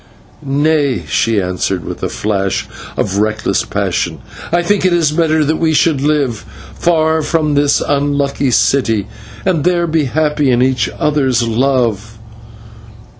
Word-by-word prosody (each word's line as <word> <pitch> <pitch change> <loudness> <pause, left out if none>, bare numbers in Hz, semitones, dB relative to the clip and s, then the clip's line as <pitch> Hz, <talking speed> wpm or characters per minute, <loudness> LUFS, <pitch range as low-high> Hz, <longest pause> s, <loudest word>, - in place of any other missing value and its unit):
"Nay," 140 - +1
she 115 +4 +1
answered, 90 -1 -2
with - - -7
a - - -2
flash 100 -2 -2 0.3
of 100 0 -1
reckless 110 0 0
passion, - - -2 0.3
"I 175 +1 +2
think 200 +3 +1
it 170 -5 +2
better 160 -2 +2
that 155 +2 0
we 160 -1 +1
should 150 -3 +2
live, 140 -6 0 0.3
far 160 -2 +1
from 155 -1 0
this 145 0 +2
unlucky 140 -1 0
city, 115 -5 +2 0.4
and 175 -6 +1
there 175 0 +2
be 160 -2 0
happy 150 +1 0
in 125 0 +3
each 130 -1 +1
other's 135 -5 +1
love. 115 -3 0
140 Hz, 135 wpm, -15 LUFS, 115-155 Hz, 0.4 s, in